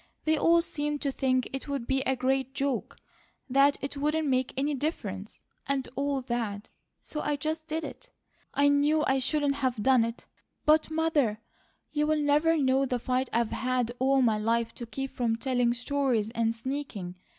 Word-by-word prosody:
They 315 0 +3
all 335 +2 +4
seemed 295 -2 -3
to 280 - 0
think 255 -2 +1
it 270 - -5
would 280 -4 -3
be 265 +2 +1
a 265 - +2
great 265 +1 0
joke, 275 -4 -2 0.5
that 275 +2 +4
it 275 - -4
wouldn't 300 +2 0
make 255 -1 +1
any 285 +2 +1
difference, 215 - -4 0.3
and 275 -1 -1
all 280 0 0
that, 230 -5 -3 0.3
so 300 - -5
I 295 - 0
just 315 +3 -3
did 320 +1 -2
it. - - -9 0.4
I 285 0 +3
knew 290 +2 +3
I 265 0 +2
shouldn't 285 +1 +1
have 255 -6 -1
done 255 -2 +5
it; 230 +1 -5 0.4
but, 310 +1 +4
Mother, 315 -9 +1 0.5
you'll 300 +1 +1
never 300 +2 +3
know 270 -1 +2
the 250 - 0
fight 255 +1 -1
I've 230 -1 +1
had 250 -2 0
all 265 +1 +3
my 220 -3 +2
life 230 +1 0
to 235 - -8
keep 270 +3 -4
from 235 -2 0
telling 245 0 +1
stories 250 -3 0
and 230 0 0
sneaking. 230 -7 -5
270 Hz, 175 wpm, -28 LUFS, 240-290 Hz, 0.5 s, done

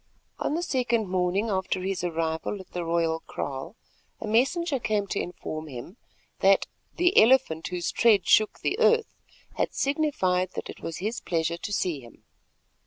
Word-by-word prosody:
On 295 - -1
the 345 - -1
second 240 - 0
morning 185 +4 +1
after 190 -1 -1
his 190 -2 -2
arrival 165 +3 -2
at 190 - -12
the 175 - -3
royal 165 -1 +1
kraal, 140 +8 -5 0.4
a - - -5
messenger 270 +7 +1
came 215 -3 0
to 200 - -2
inform 155 -3 -6
him 140 - -9 0.4
that - - +4 0.3
"the 355 +2 +5
Elephant 225 -9 +3
whose 180 -1 -2
tread 220 -5 +4
shook 215 -1 +3
the 400 - -1
earth" 465 -1 +3 0.4
had - - -1
signified 195 - +1
that - - -5
it - - -13
was 165 - -5
his 215 +6 -3
pleasure 165 -1 -1
to 205 - -6
see 180 -6 0
him. 120 -3 -16
190 Hz, 165 wpm, -27 LUFS, 170-235 Hz, 0.4 s, the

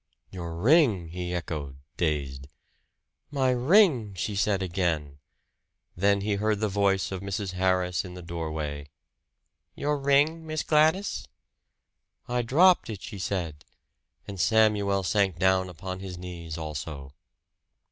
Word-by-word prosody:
"Your 85 -3 -6
ring!" 110 - +3
he 90 +1 -5
echoed, 75 -6 -4 0.2
dazed. 70 -5 -2 0.8
"My 135 -3 +1
ring!" 125 - +4
she 100 +3 -3
said 100 -1 +1
again; 85 -6 -2 0.8
then 100 +2 +2
he 100 0 0
heard 110 -1 +1
the 110 - +1
voice 100 -1 +1
of 95 -1 -4
Mrs. 100 0 -3
Harris 90 -1 +1
in 90 -2 -9
the 90 - -9
doorway. 80 -4 -5 0.9
"Your 145 0 -1
ring, 145 +4 +2
Miss 155 0 -2
Gladys?" 160 +6 +2 1.0
"I 125 0 0
dropped 165 +9 +4
it," 105 -3 -6
she 105 -5 -7
said; 85 -6 -3 0.6
and 100 -2 -7
Samuel 105 -2 +3
sank 95 -2 +1
down 95 0 +2
upon 95 +1 -6
his 95 -2 -7
knees 85 -3 -7
also. 75 -3 -6
95 Hz, 125 wpm, -27 LUFS, 85-110 Hz, 1.0 s, ring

